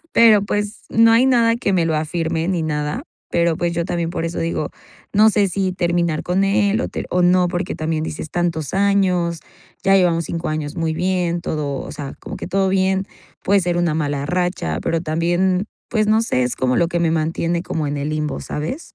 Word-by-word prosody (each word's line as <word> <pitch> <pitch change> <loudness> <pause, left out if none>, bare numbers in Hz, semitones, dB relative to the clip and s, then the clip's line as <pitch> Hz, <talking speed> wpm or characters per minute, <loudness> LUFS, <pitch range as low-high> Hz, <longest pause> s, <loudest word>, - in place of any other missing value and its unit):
pero, 220 -3 +6
pues, 205 +1 -3
no 225 0 +5
hay 240 +3 +5
nada 235 -3 +4
que 200 -5 -1
me 170 -3 +2
lo 160 - 0
afirme 160 +1 -1
ni 175 -4 0
nada, 150 - -2 0.3
pero, 170 -1 +2
pues, 175 -1 -1
yo 170 0 -1
también 170 -2 -2
por 165 - -3
eso 165 - -4
digo, 165 -2 -2 0.4
no 215 +2 +6
sé 200 -2 +2
si 190 0 -1
terminar 170 -3 0
con 185 +2 +1
él 200 +2 +2
o - - -1 0.2
o 180 0 +2
no, 180 0 +4
porque 175 +1 -3
también 155 0 -2
dices 155 0 -6
tantos 165 -4 -1
años, 185 -4 +2 0.4
ya 195 0 +5
llevamos 170 -3 +2
5 165 0 -3
años 155 -1 -3
muy 160 -1 -1
bien, 175 -1 0
todo, 145 -3 -3
o - - -8
sea, 140 -2 -6
como - - -7
que - - -6
todo 195 0 +1
bien, 190 0 +1 0.4
puede 200 +1 +4
ser 175 -1 -1
una 170 -3 +1
mala 145 -3 -1
racha, 175 - -1
pero 165 0 0
también, 175 +4 +1 0.2
pues, 215 -2 +1
no 220 +1 +4
sé, 125 - +1
es 125 - -2
como 125 -1 +1
lo 170 - +3
que 170 0 -1
me 165 -1 +2
mantiene 165 +2 -1
como 155 -4 -3
en 145 - -3
el 145 +2 -2
limbo, 150 -1 -2
¿sabes? 160 - -5
175 Hz, 210 wpm, -20 LUFS, 160-195 Hz, 0.4 s, pero